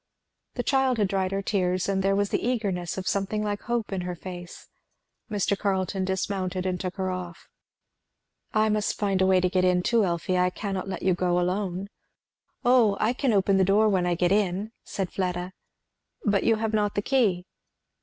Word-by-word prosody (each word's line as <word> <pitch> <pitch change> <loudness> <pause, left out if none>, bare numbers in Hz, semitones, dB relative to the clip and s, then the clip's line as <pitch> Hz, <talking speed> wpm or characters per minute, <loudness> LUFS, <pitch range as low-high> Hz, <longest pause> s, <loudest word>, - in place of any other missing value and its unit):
The 245 - -2
child 265 -2 +2
had 205 -3 +1
dried 190 -1 0
her 195 0 -2
tears, 185 -3 0
and 195 -1 +1
there 195 +1 +2
was 200 0 +1
the - - 0
eagerness 200 -9 -1
of 185 - -4
something 200 +2 -1
like 205 -1 -2
hope 235 -4 -2
in 190 - -2
her 180 0 -4
face. 175 0 -9 0.6
Mr. 205 -1 0
Carleton 190 -1 -1
dismounted 185 -1 -2
and 180 -1 -1
took 185 0 -4
her 190 -1 -2
off. 180 -2 -7 1.0
"I 215 0 +3
must 210 -1 0
find 195 -2 0
a 190 - +4
way 190 -1 +5
to 180 - +2
get 185 0 +1
in 180 -1 +3
too, 230 +1 +3
Elfie, 180 0 0
I 180 0 +3
cannot 195 0 -4
let 190 - -5
you 185 0 +3
go 180 0 +1
alone." 185 +1 -1 0.8
"O 240 -5 +4
I 220 +3 +2
can 260 0 0
open 195 -1 +3
the 190 - +4
door 205 +3 +4
when 185 -3 +1
I 175 - +1
get 175 +1 +1
in," 200 +1 +1
said 190 -2 -4
Fleda. 180 -1 -2 0.7
"But 205 -2 +2
you 225 - +4
have 220 0 -2
not 210 -1 +1
the 205 - 0
key." 205 -10 +1
195 Hz, 195 wpm, -26 LUFS, 180-210 Hz, 1.0 s, way